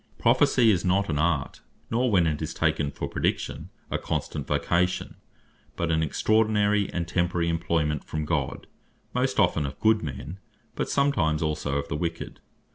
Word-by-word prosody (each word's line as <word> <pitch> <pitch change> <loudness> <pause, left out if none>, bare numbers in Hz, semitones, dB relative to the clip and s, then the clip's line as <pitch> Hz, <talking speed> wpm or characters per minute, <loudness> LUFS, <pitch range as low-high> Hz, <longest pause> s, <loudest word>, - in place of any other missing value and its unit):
Prophecy 115 -3 +4
is 90 -4 +1
not 95 +1 +1
an 75 - 0
art, 75 -3 0 0.3
nor 125 +2 +2
(when 95 -6 +4
it 75 -2 -1
is - - -4
taken 70 - +1
for - - -5
Praediction) - - -2 0.2
a - - 0
constant 70 - -3
Vocation; 90 +1 0 0.6
but 85 -1 -1
an 80 0 +2
extraordinary, 105 +4 +2
and 85 -1 -2
temporary 85 -1 0
Employment 80 -3 0
from 75 0 -4
God, 75 -4 -2 0.5
most 130 0 0
often 85 -6 +3
of 70 -1 -5
Good 110 0 +3
men, 80 +5 -6 0.3
but - - -3
sometimes 85 - +1
also 75 -2 -1
of 70 - -3
the 80 - -3
Wicked. 85 +2 -4
85 Hz, 160 wpm, -26 LUFS, 75-105 Hz, 0.6 s, Prophecy